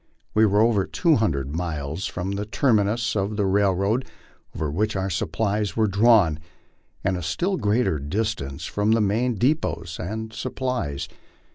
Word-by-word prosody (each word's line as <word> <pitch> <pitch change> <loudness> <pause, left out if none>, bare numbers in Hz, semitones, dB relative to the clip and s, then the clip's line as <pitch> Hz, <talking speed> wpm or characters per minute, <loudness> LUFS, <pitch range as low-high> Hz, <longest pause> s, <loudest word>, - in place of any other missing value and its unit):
We 110 0 +5
were 100 +1 +3
over 110 -4 +3
two 165 -4 +2
hundred 70 -10 -1
miles 80 0 -3
from 90 +2 -4
the 100 +1 -3
terminus 110 -2 +1
of 105 +1 -1
the 100 - +1
railroad 100 +5 +1 0.5
over 75 -2 -2
which 105 +7 0
our 95 0 -1
supplies 105 +6 -1
were 110 - +4
drawn, 100 -6 +4 0.6
and 95 -1 0
a - - -4
still 170 - -1
greater 105 - +1
distance 75 -3 -3
from 105 +2 +1
the 115 - +3
main 115 +4 +1
depots 95 - -1
of 110 +5 -5
supplies. 125 - -3
105 Hz, 150 wpm, -24 LUFS, 90-110 Hz, 0.6 s, We